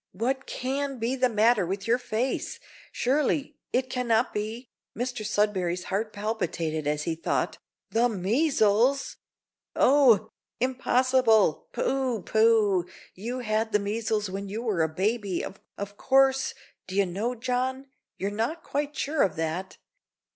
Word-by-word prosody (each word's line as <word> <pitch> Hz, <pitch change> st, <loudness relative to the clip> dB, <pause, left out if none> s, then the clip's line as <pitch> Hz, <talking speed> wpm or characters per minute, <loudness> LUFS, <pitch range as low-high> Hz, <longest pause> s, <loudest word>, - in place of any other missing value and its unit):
What 260 Hz, +7 st, -2 dB
can 275 Hz, +1 st, -2 dB
be 235 Hz, +3 st, -1 dB
the 255 Hz, -1 st, +2 dB
matter 220 Hz, -1 st, +3 dB
with 195 Hz, +3 st, -3 dB
your 235 Hz, +2 st, +2 dB
face? 245 Hz, +1 st, -2 dB, 0.3 s
surely 285 Hz, +2 st, 0 dB, 0.2 s
it 255 Hz, +1 st, +1 dB
cannot 240 Hz, -2 st, +1 dB
be," 220 Hz, +4 st, -4 dB, 0.3 s
(Mr 245 Hz, -2 st, -3 dB
Sudberry's 195 Hz, -4 st, 0 dB
heart 215 Hz, +2 st, -1 dB
palpitated 170 Hz, -8 st, -2 dB
as 150 Hz, 0 st, 0 dB
he 165 Hz, -, -1 dB
thought), 160 Hz, -, -1 dB, 0.3 s
"the 235 Hz, +2 st, +3 dB
measles! 230 Hz, -, +2 dB, 0.6 s
Oh! 250 Hz, -6 st, +5 dB, 0.3 s
impossible, 255 Hz, -6 st, +3 dB
pooh! 260 Hz, -6 st, -1 dB
pooh! 220 Hz, -5 st, +3 dB, 0.3 s
you 240 Hz, +7 st, -5 dB
had 220 Hz, -1 st, -1 dB
the -, -, +6 dB
measles 210 Hz, +1 st, -1 dB
when 195 Hz, +1 st, -5 dB
you 220 Hz, +4 st, -4 dB
were 210 Hz, -8 st, 0 dB
a 160 Hz, -, +2 dB
baby, 195 Hz, +2 st, -1 dB
of 200 Hz, +1 st, -9 dB
course 270 Hz, 0 st, +3 dB, 0.3 s
d'ye 195 Hz, +1 st, +1 dB
know, 205 Hz, +8 st, -2 dB
John, 255 Hz, +2 st, -2 dB, 0.3 s
you're 200 Hz, +1 st, -2 dB
not 235 Hz, +11 st, -2 dB
quite 290 Hz, +1 st, -2 dB
sure 300 Hz, +1 st, 0 dB
of 185 Hz, -, +2 dB
that. 165 Hz, +4 st, -3 dB
225 Hz, 135 wpm, -27 LUFS, 200-255 Hz, 0.6 s, the